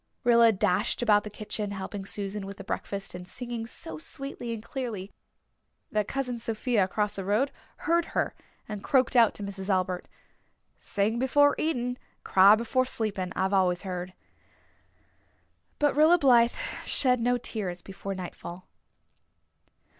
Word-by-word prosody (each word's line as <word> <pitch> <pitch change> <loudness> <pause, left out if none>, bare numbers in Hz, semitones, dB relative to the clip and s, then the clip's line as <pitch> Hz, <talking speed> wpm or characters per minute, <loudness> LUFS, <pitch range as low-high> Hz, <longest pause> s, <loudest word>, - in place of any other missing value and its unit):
Rilla 235 -1 +6
dashed 185 +3 +1
about 210 -3 +4
the 210 - -6
kitchen 210 0 -4
helping 195 0 -5
Susan 200 -1 -4
with 200 0 -8
the 195 - -8
breakfast 195 0 -4
and 180 0 -8
singing 235 +1 -5
so 160 -8 -6
sweetly 270 - -6
and 225 -2 -5
clearly 230 -7 -5 0.8
that 210 -1 0
Cousin 250 -3 -2
Sophia 225 -2 +1
across 210 +2 -1
the 195 - -4
road 215 +9 +1 0.3
heard 340 0 +3
her - - +1 0.3
and 210 -2 -6
croaked 260 -1 +2
out 230 -3 +5
to 205 - -6
Mrs. 195 0 -6
Albert, 185 -2 0 0.7
"'Sing 210 +3 0
before 285 +3 +4
eating, 250 -5 -1 0.2
cry 195 +2 +7
before 245 +3 +1
sleeping,' 205 -7 -2
I've 190 +1 0
always 180 -1 +2
heard." 180 -1 -5 1.6
But 290 -2 +2
Rilla 315 +4 +6
Blythe 245 -6 +5 0.3
shed 250 -2 +3
no 245 +1 +2
tears 190 -7 -4
before 195 0 -6
the 185 - -5
nightfall. 175 0 -9
210 Hz, 145 wpm, -28 LUFS, 195-245 Hz, 1.6 s, cry